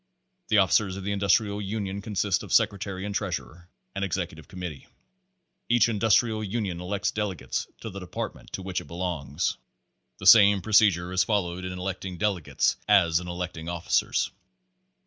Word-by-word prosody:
The 110 - +3
officers 95 0 +3
of 100 - -7
the 100 - -2
Industrial 100 +1 +2
Unions 100 -1 -4
consist 105 -5 0
of - - -9
sec - - +5
retary 100 -1 -6
and 105 - -4
treasurer, 85 - -4 0.2
and 100 - -3
executive 85 -6 -3
committee. 90 -6 -7 0.8
Each 120 -1 +5
Industrial 110 0 +2
Union 100 -4 -3
elects 100 +2 -1
delegates 105 -4 -3
to 110 - -6
the 100 - -7
Department 90 -2 -6
to 95 - -4
which 95 -1 -3
it - - -14
belongs. 85 -4 -2 0.6
The 95 - -9
same 100 -1 +8
procedure 100 -5 +4
is 95 0 +3
followed 95 -4 -1
in 90 - -4
electing 90 0 -4
delegates 95 -5 0
as 85 -6 +4
in 90 - -8
electing 85 -2 -5
officers. 85 0 0
95 Hz, 155 wpm, -26 LUFS, 90-105 Hz, 0.8 s, same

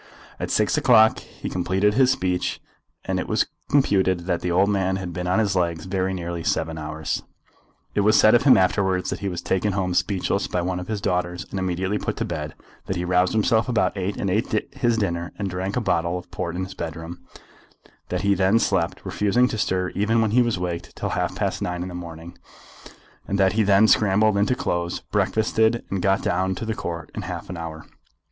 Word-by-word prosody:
At - - -3
six - - +2
o'clock 110 -2 +5
he - - -9
completed 95 +3 +1
his 130 +2 +4
speech, 95 -9 0 0.5
and - - -1
it - - -3
was - - +2 0.2
computed 95 -10 +2
that 85 -1 -2
the 90 - -2
old 95 +3 +3
man 95 -2 +1
had 90 -2 -5
been 90 0 -4
on 90 - +2
his 105 -3 +1
legs 85 -3 0
very 95 0 -1
nearly 85 -2 -4
seven 80 -3 -1
hours. 75 0 -3 0.7
It - - 0
was 105 +1 +4
said 110 - +6
of 120 - +5
him 135 -2 +6
afterwards 95 0 +1
that - - -3
he 100 - -2
was 90 -2 -5
taken 95 +2 0
home 95 -2 -1
speechless 100 +1 0
by 90 - -1
one 90 0 -2
of 90 - -7
his 110 -2 -3
daughters 90 -3 -1
and 95 - -3
immediately 95 +2 -1
put - - -3
to - - -1
bed, - - -5 0.3
that 95 - -2
he 90 0 -2
roused 90 +1 +2
himself 110 +2 +2
about 115 -3 +1
eight 95 +1 -3
and 100 - -1
ate 110 +5 -1
his 120 -2 +1
dinner 85 -5 -2
and 100 -2 -3
drank 95 +2 -3
a - - +3
bottle 85 -3 0
of 90 - -10
port 85 0 -4
in 95 - -2
his 95 - -7
bedroom, 80 +1 -6 0.9
that - - -1
he 100 0 +3
then 95 +3 +3
slept, 95 -6 0
refusing 120 +5 +2
to 110 - -3
stir 90 -2 0
even 110 +3 +1
when 110 -2 +2
he 125 +3 +5
was 120 -5 +1
waked, 90 -1 -4
till - - -3
half - - -1
past - - -2
nine 90 0 -2
in 90 - -5
the - - -8
morning, 85 -1 -8 0.9
and 100 - -1
that 95 -1 +3
then 100 -2 +4
he - - +6
scrambled 105 0 +4
into 105 +5 +2
his - - -6
clothes, 85 0 -1
breakfasted, 110 +1 +1
and 95 -1 -1
got 95 +1 +2
down 95 +2 0
to 110 - -5
the 110 - -1
Court 85 -5 -5
in - - -4
half - - -6
an 90 - -6
hour. 80 -1 -7
95 Hz, 220 wpm, -23 LUFS, 90-105 Hz, 0.9 s, said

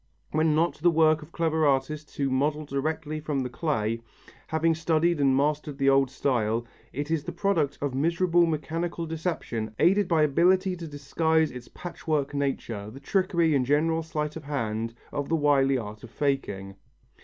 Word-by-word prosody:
When 155 0 +2
not 165 +2 +1
the 175 +3 +4
work 160 -1 +4
of 150 +2 -12
clever 160 -2 0
artists 145 +2 0
who 140 -2 0
model 150 +3 0
direct 155 +3 -2 0.2
from 145 -3 -1
the 125 -1 -4
clay, 115 -7 -1 0.5
having 160 +1 +2
studied 160 0 +1
and 135 -1 +4
mastered 150 0 0
the 135 -1 +3
old 135 -1 +4
style, 120 -4 0 0.3
it 145 +3 -4
is 160 -3 0
the - - -3
product 170 -8 0
of 140 -2 -1
miserable 170 +4 +2
mechanical 165 +2 -2
deception 155 -10 -3
aided 195 +4 +4
by 165 -3 +3
ability 180 +6 +3
to 170 -1 -7
disguise 160 +2 +1
its 125 -1 -9
patchwork 155 -5 -3
nature, 125 -7 -2
the 130 +5 -10
trickery 170 0 +1
and 130 -3 +1
general 160 +3 +2
sleight 150 -2 -3
of 160 -3 -8
hand 115 -5 -2 0.2
of 145 -1 -3
the 165 - +2
wily 140 -3 +3
art 105 -3 -7
of 120 - -9
faking. 100 -9 -2
150 Hz, 170 wpm, -27 LUFS, 135-165 Hz, 0.5 s, the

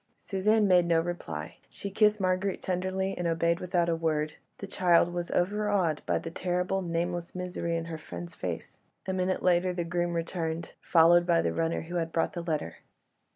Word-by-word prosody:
Suzanne 210 +2 +2
made 180 -2 +5
no 165 -1 +4
reply. 85 - -5
She 200 - -7
kissed 210 +1 +3
Marguerite 185 +1 0
tenderly, 185 +1 -1
and 175 - -2
obeyed 170 +1 +1
without 175 -1 0
a 170 - +2
word; 155 -2 -1 0.2
the - - -6
child 175 -3 +3
was 175 -1 -3
overawed 195 -4 +1
by - - +2
the - - -5
terrible, 180 +2 -1
nameless 170 0 -2
misery 180 -2 -2
in 165 - -3
her 165 -1 -6
friend's 85 - -8
face. - - -6 0.3
A 190 - -2
minute 185 0 0
later 180 0 +3
the 175 -1 -2
groom 175 +1 -1
returned, 165 -1 -3
followed 175 +1 +5
by 170 -1 +3
the - - 0
runner 165 0 0
who 175 +2 -4
had 165 -1 -2
brought 165 +5 0
the 175 - -4
letter. 155 - -3
175 Hz, 185 wpm, -29 LUFS, 165-185 Hz, 0.3 s, made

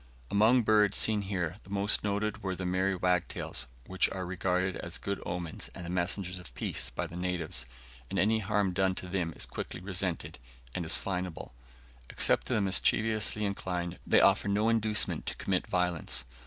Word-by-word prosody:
Among 115 +5 +5
birds 105 -2 +4
seen 110 -2 +3
here, 95 -3 -2
the - - -16
most 100 +1 +1
noted 105 +1 -1
were 95 -2 -2
the 95 - -4
merry 95 +2 +1
wagtails, 90 -6 -1 0.2
which 95 0 +2
are 95 -1 -4
regarded 90 +1 0
as 85 +2 -5
good 100 0 -3
omens 85 -2 -4
and 85 - -7
messengers 90 +1 -1
of 90 - -11
peace - - -2
by 90 - -3
the 85 0 -9
natives, 90 -7 -1 0.4
and - - -3
any 110 +2 +3
harm 100 -2 +1
done 95 0 +2
unto 90 - -6
them 90 -3 -1
is - - -1
quickly - - -6
resented, 95 -1 -2 0.3
and 85 -3 -3
is - - +3
fineable. 90 -3 -4 0.6
Except - - +2
to - - 0
the - - +2
mischievously 105 +2 +2
inclined, 90 -3 -3
they - - +6
offer - - +4
no 105 +3 +2
inducement 110 -2 +2
to - - -3
commit 95 -2 -1
violence. 90 -7 0
95 Hz, 175 wpm, -31 LUFS, 90-100 Hz, 0.6 s, they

